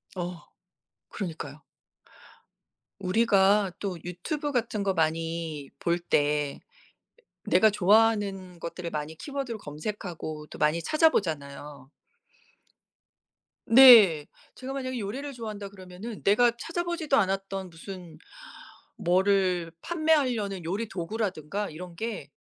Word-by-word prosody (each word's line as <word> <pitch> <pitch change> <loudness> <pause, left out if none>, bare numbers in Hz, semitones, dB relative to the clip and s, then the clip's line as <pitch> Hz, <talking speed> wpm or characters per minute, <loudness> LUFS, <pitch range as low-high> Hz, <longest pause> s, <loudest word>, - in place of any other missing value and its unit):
어 175 -1 -5 0.7
그러니까요. 155 -6 -6 1.4
우리가 200 0 +3
또 190 -4 -3
유튜브 285 - -4
같은 230 -5 -1
거 195 -1 +1
많이 160 -3 -2
볼 170 0 0
때 145 -3 0 0.8
내가 220 - +4
좋아하는 200 -3 +2
것들을 170 +1 -5
많이 155 0 -5
키워드로 270 - -5
검색하고 155 -2 -6
또 - - -11
많이 150 +3 +2
찾아 315 - +4
보잖아요. 145 - -4 1.8
네. 225 - +9 0.3
제가 260 +1 -6
만약에 255 -2 -3
요리를 265 +8 -5
좋아한다 215 -4 -6
그러면은 195 +3 -9
내가 235 +4 +5
찾아 335 +6 -3
보지도 330 -5 0
않았던 195 -1 -1
무슨 170 -1 -10 0.8
뭐를 185 -2 +2
판매하려는 260 - +1
요리 205 +7 -2
도구라든가 195 -1 -3
이런게 175 +1 -6
195 Hz, 250 characters per minute, -27 LUFS, 165-225 Hz, 1.8 s, 네